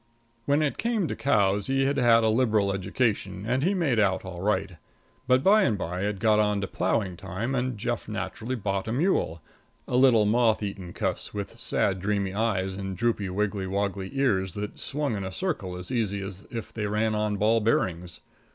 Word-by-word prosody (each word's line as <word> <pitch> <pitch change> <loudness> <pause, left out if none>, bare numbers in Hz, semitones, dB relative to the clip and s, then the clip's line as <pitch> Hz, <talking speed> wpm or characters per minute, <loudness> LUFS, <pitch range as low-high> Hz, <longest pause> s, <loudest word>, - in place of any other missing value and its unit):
When 145 +2 +2
it 145 - -1
came 230 -6 0
to - - -2
cows, 100 -6 +2
he 135 0 +2
had 140 +1 +1
had 115 -3 +5
a 110 - +3
liberal 110 -4 +2
education 95 0 -1
and 125 +4 0
he 190 +7 +2
made 145 - +1
out 95 -2 +1
all 90 -2 -7
right, 100 -3 -1 0.5
but 130 +1 +4
by 210 +3 +6
and 115 - +2
by 90 0 -3
it 105 -1 -1
got 110 +1 +3
on 105 -1 +2
to - - -1
ploughing 95 0 -1
time 100 +10 -4
and 125 -2 -1
Jeff 120 +2 -3
naturally 105 +4 -4
bought 100 -3 -2
a - - -2
mule 125 - 0 0.4
a - - -2
little 125 -4 +5
moth 110 0 +3
eaten 95 -3 -5
cuss, - - -3
with 100 -1 -5
sad, 95 -1 0
dreamy 100 -1 -1
eyes 100 -3 0
and 95 -1 -5
droopy, 110 -3 0
wiggly 100 0 -1
woggly 100 0 -2
ears 95 -10 +1
that 105 0 -5
swung 145 -4 -2
in 100 - -3
a 95 - -4
circle 100 - -3
as 90 +6 -7
easy 105 -5 0
as 95 0 -8
if 115 -1 -6
they 105 -2 -2
ran 110 +1 0
on 105 -1 0
ball 110 +3 +3
bearings. 90 -5 -1
105 Hz, 195 wpm, -27 LUFS, 95-120 Hz, 0.5 s, by